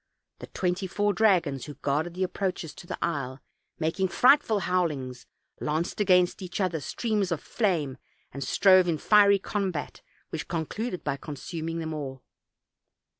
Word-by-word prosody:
The - - -8
twenty 180 +1 -1
four 205 +2 +1
dragons 175 -12 +2
who 145 -1 -8
guarded 150 +5 -1
the 185 - 0
approaches 185 -3 -3
to 175 - -12
the - - -4
isle, 140 -5 -2 0.4
making 170 +4 0
frightful 245 0 +4
howlings, 150 -10 -1 0.3
lanced 160 +7 -1
against 180 -1 +3
each 180 +1 -5
other 180 -4 0
streams 205 - -1
of 165 - 0
flame, 155 - -1 0.3
and 140 +1 -5
strove 185 +6 +5
in 165 -2 +1
fiery 200 +3 +5
combat, 190 -6 -3 0.3
which - - -5
concluded 180 +5 -3
by 140 - -1
consuming 160 +3 -5
them 160 -1 -3
all. 135 -4 -6
175 Hz, 145 wpm, -27 LUFS, 150-195 Hz, 0.4 s, strove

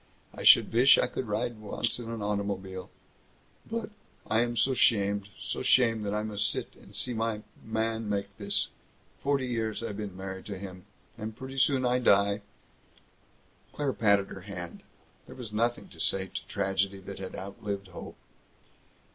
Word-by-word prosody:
I - - -8
should - - +8
vish 125 +4 +7
I - - +4
could 130 - -4
ride 110 +2 -1
once 110 +3 -1
in 115 -1 -6
an 115 -2 -4
automobile! 100 -2 -2 0.8
But 225 -1 -3 0.4
I 110 +1 +3
am 120 0 -1
so 130 +4 +3
'shamed, 100 -4 +3
so - - -3
'shamed 115 -4 +4
that 100 - -1
I 105 - 0
must 105 -1 0
sit - - -3
and - - -15
see 125 - 0
my 110 -1 -1 0.2
Mann 110 0 -1
make 100 -1 -2
this. - - +1 0.5
Forty 140 -2 +1
years 115 -2 -1
I 115 - -2
been 100 -2 -5
married 95 0 -6
to 100 -2 -4
him, 95 -1 -8 0.3
and 110 0 -5
pretty 135 +1 -5
soon 130 -1 +4
I 125 0 +3
die 100 -3 +4 0.6
" - - -34
Claire 145 -3 0
patted 100 -4 +3
her 95 - -8
hand. 90 -3 -7 0.5
There - - -10
was 115 -4 -7
nothing 120 +2 0
to 85 - -13
say 95 +3 +3
to - - -5
tragedy 100 0 0
that 95 +1 -8
had 95 -1 -6
outlived 100 0 -5
hope. 90 - -8
105 Hz, 170 wpm, -30 LUFS, 100-115 Hz, 0.8 s, should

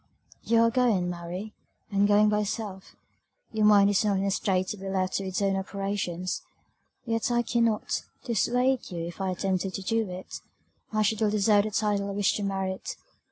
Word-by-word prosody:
"You 230 0 +3
are 230 0 +4
going, 225 -8 +2
Mary, 175 +5 -6 0.4
and 200 0 +3
going 210 +1 +5
by 210 0 +2
yourself; 205 -2 -4 0.6
your 215 -1 +3
mind 200 -1 +7
is 200 - +2
not 205 -2 +2
in 195 - 0
a 200 - +1
state 190 -2 0
to 210 - -4
be 195 0 -6
left 185 -1 -1
to 195 - -3
its 190 +2 -1
own 195 -1 +2
operations 195 -2 -3 0.6
yet 225 -1 0
I 240 0 +2
cannot, 230 -2 0 0.2
dissuade 250 +2 +1
you; 170 -3 -4
if 175 +3 -7
I 190 - 0
attempted 185 +1 -1
to 195 - -5
do 225 0 0
it, 180 +1 -7 0.5
I 215 0 +2
should 215 +1 0
ill 215 - +3
deserve 205 0 +3
the - - -1
title 205 -1 0
I - - -3
wish 200 -1 +2
to 205 - -3
merit. 190 -1 -3
200 Hz, 195 wpm, -27 LUFS, 190-215 Hz, 0.6 s, mind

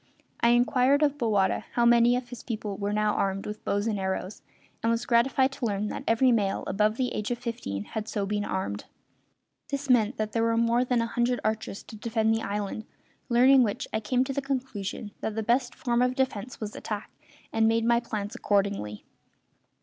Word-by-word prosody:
I 235 - +4
inquired 250 +4 +4
of 290 0 +1
Bowata 210 -5 +1
how 240 - +2
many 240 +1 +5
of 250 0 -4
his 245 -3 -8
people 215 -4 -4
were 200 +1 -2
now 210 0 +1
armed 195 0 -1
with 210 0 -6
bows 205 +1 0
and 215 -3 -1
arrows, 190 +1 -3 0.4
and 230 - +1
was 230 +1 -1
gratified 260 +3 +3
to 270 -2 -4
learn 205 0 -1
that - - -5
every 245 +3 +4
male 205 -4 +1
above 210 +3 +1
the 255 -1 -1
age 210 - -3
of 245 - -1
fifteen 230 - -4
had 215 - -5
been 205 -1 -2
so - - -4
armed. 105 - -3 0.8
This 280 -1 -1
meant 230 -1 +3
that 215 0 -2
there 230 - 0
were 230 0 +2
more 235 +1 +3
than 245 -2 +1
a - - -1
hundred 240 +1 0
archers 215 -2 -2
to - - -11
defend 220 0 0
the 225 - 0
island; 205 +1 -3 0.4
learning 255 +3 +6
which 215 -4 -1
I 220 - +1
came 250 +4 +1
to 270 +1 -4
the 280 - -1
conclusion 245 -6 -4
that 220 - -3
the 220 - -1
best 240 +3 +1
form 240 -1 0
of 250 0 +2
defence 255 -3 -2
was 215 -1 -5
attack, 210 -1 -5 0.4
and 225 0 +3
made 225 0 +2
my 235 0 +4
plans 215 -3 -4
accordingly. 200 - -1
225 Hz, 205 wpm, -27 LUFS, 210-245 Hz, 0.8 s, learning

